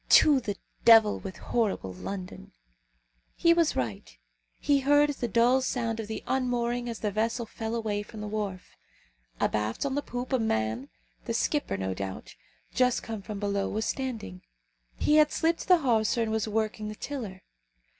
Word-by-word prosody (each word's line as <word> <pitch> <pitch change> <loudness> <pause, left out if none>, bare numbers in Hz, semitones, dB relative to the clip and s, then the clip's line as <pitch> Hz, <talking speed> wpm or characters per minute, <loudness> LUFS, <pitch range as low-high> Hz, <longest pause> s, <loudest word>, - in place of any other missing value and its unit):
To 290 -3 +7
the 205 -5 -4 0.3
devil 225 -2 +7
with 190 -1 -7
horrible 200 - -1
London!" 185 - -7 0.8
He 335 0 +5
was 335 -2 +2
right. 100 - -4 0.4
He 285 -1 +3
heard 290 +2 +4
the 255 -4 -3
dull 240 +4 +4
sound 230 -3 -1
of 220 - -4
the 220 - -5
unmooring 245 -2 -1
as 230 - -6
the 210 - 0
vessel 225 +3 -1
fell 225 +1 -5
away 215 -3 -1
from 215 +1 -10
the 210 - -5
wharf. 205 -3 -4 0.6
Abaft 105 - 0
on 275 - -1
the 285 - 0
poop 250 -1 -5
a 260 - +3
man, 110 - -1 0.4
the - - -2
skipper, - - 0
no 95 0 -2
doubt, 95 0 -6 0.4
just 250 -1 +2
come 220 -2 -5
from 205 +1 -6
below, 200 -1 -1
was 220 +1 -2
standing. 230 - -4 0.5
He 300 - +3
had 300 -1 +5
slipped 330 0 0
the 360 - +7
hawser 230 -3 +2
and 220 - -2
was 220 0 0
working 215 0 -1
the 215 - -6
tiller. 215 -9 -6
220 Hz, 170 wpm, -28 LUFS, 200-250 Hz, 0.8 s, To